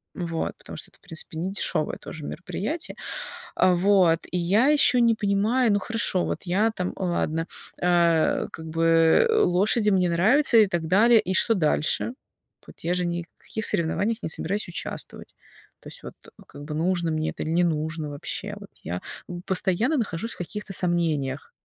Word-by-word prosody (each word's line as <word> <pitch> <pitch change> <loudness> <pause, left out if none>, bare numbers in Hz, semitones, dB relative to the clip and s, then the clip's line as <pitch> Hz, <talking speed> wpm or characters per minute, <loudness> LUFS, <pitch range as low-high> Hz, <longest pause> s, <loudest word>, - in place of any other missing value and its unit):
вот, 165 -2 -3
потому - - -10
что - - -6
это, - - -26
в - - -52
принципе, 160 0 -5
не 180 +3 -2
дешёвое 165 -5 -1
тоже 160 - -9
мероприятие, 215 - -4 0.6
а, 185 - +4
вот, 180 -3 +4
и 180 - 0
я 195 +9 +3
ещё 275 -4 +5
не 235 -1 +4
понимаю. 215 +3 +1
Ну 205 - +2
хорошо, 225 -4 0
вот - - -4
я 200 +5 +1
там, 180 -4 -3
ладно, 165 -3 -1 0.3
э, 170 -2 +2
как 160 - -9
бы, 165 - +4
э, - - +2
лошади, 210 - +3
мне 185 -2 +2
нравится 220 - +3
и 215 -2 +6
так 175 -3 -2
далее, 220 +6 +5
и 185 -2 -2
что 225 - +4
дальше? 160 +5 +1 0.5
Вот - - -15
я 170 - -1
же 180 0 0
ни 175 0 -2
в 170 - -25
каких 220 -1 -2
соревнованиях 205 +5 0
не - - -2
собираюсь 200 +6 -2
участвовать. 170 - -7 0.5
То - - -13
есть, - - -11
вот, - - -8 0.3
как 145 - -11
бы, 150 +1 -6
нужно 170 +1 0
мне 155 0 -1
это - - -6
или - - -4
не 175 +2 +3
нужно 155 -1 -2
вообще. 145 -1 -5
Вот - - -12
я 90 +2 -4 0.4
постоянно 195 - +2
нахожусь 225 -1 -3
в - - -13
каких-то 210 +3 -6
сомнениях. 160 -7 -1
180 Hz, 180 wpm, -25 LUFS, 165-210 Hz, 0.6 s, и